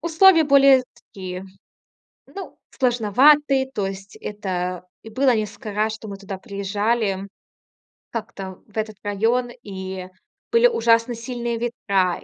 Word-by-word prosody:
условия 335 +1 +5
более 275 -2 +6 0.2
такие 185 -1 -7 0.8
Ну, 390 - -9
сложноватые. 265 +3 +3
То 205 -6 -2
есть 195 +1 -7
это 180 -3 -4 0.2
и 225 - -10
было 255 +1 +3
несколько 215 +1 -4
раз, 215 +1 0
что 220 0 -9
мы 200 -1 -6
туда 195 -1 -7
приезжали 200 0 -1 0.8
как-то 195 -4 -6
в 210 - -14
этот 215 -1 -3
район, 225 +5 +1
и 190 -2 -6 0.4
были 465 +1 +6
ужасно 230 - +2
сильные 235 0 -4
ветра, 200 -6 0
220 Hz, 125 wpm, -22 LUFS, 195-250 Hz, 0.8 s, более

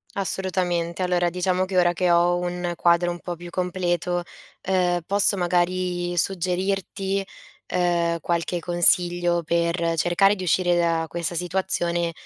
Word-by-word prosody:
Assolutamente. 180 -3 -2
Allora, 180 -1 +1
diciamo 180 +1 0
che 185 0 -6
ora 175 -1 +4
che 180 0 +1
ho 175 +1 +3
un 175 0 -3
quadro 170 +1 +2
un 175 - -5
po' 175 0 -6
più 175 +1 -10
completo, 180 -1 -1 0.5
uhm, 180 -2 +1
posso 200 0 +4
magari 175 0 -1
suggerirti, 195 +2 -1 0.5
uhm, 170 -1 +1
qualche 170 +1 -2
consiglio 175 0 +2
per 170 0 0
cercare 195 +5 +3
di 185 - -6
uscire 175 0 +2
da 165 -1 +1
questa 170 +1 -4
situazione 175 -1 0
175 Hz, 130 wpm, -23 LUFS, 175-185 Hz, 0.5 s, ora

